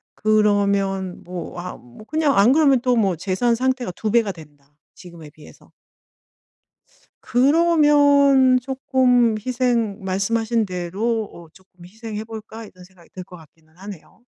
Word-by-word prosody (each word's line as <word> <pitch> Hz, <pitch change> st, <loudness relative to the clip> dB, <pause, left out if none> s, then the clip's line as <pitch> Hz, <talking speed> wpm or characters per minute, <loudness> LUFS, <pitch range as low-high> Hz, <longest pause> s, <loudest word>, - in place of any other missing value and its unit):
그러면 200 Hz, -3 st, 0 dB
뭐 180 Hz, 0 st, -8 dB
아 180 Hz, -, -7 dB
뭐 125 Hz, -, -16 dB
그냥 305 Hz, -4 st, 0 dB
안 210 Hz, +6 st, +5 dB
그러면 285 Hz, -4 st, +3 dB
또 250 Hz, -1 st, +1 dB
뭐 195 Hz, -6 st, +1 dB
재산 190 Hz, +7 st, -1 dB
상태가 255 Hz, -3 st, -2 dB
2 215 Hz, -, -3 dB
배가 225 Hz, -3 st, +2 dB
된다, 145 Hz, -4 st, -17 dB, 0.2 s
지금에 170 Hz, -4 st, -13 dB
비해서. 150 Hz, 0 st, -18 dB, 1.5 s
그러면 285 Hz, -2 st, +3 dB
쪼끔 255 Hz, -3 st, +1 dB
희생 240 Hz, -5 st, -1 dB
말씀하신 220 Hz, +4 st, -1 dB
대로 195 Hz, +5 st, -3 dB
어 170 Hz, -1 st, -13 dB
'쪼끔 185 Hz, -2 st, -19 dB
희생해 215 Hz, +2 st, -8 dB
볼까.' 220 Hz, 0 st, -10 dB
이런 185 Hz, -3 st, -16 dB
생각이 180 Hz, -2 st, -21 dB
들 185 Hz, -, -8 dB
것 180 Hz, 0 st, -14 dB
같기는 160 Hz, +1 st, -22 dB
하네요. 200 Hz, +2 st, -12 dB
215 Hz, 265 characters per minute, -20 LUFS, 185-250 Hz, 1.5 s, 안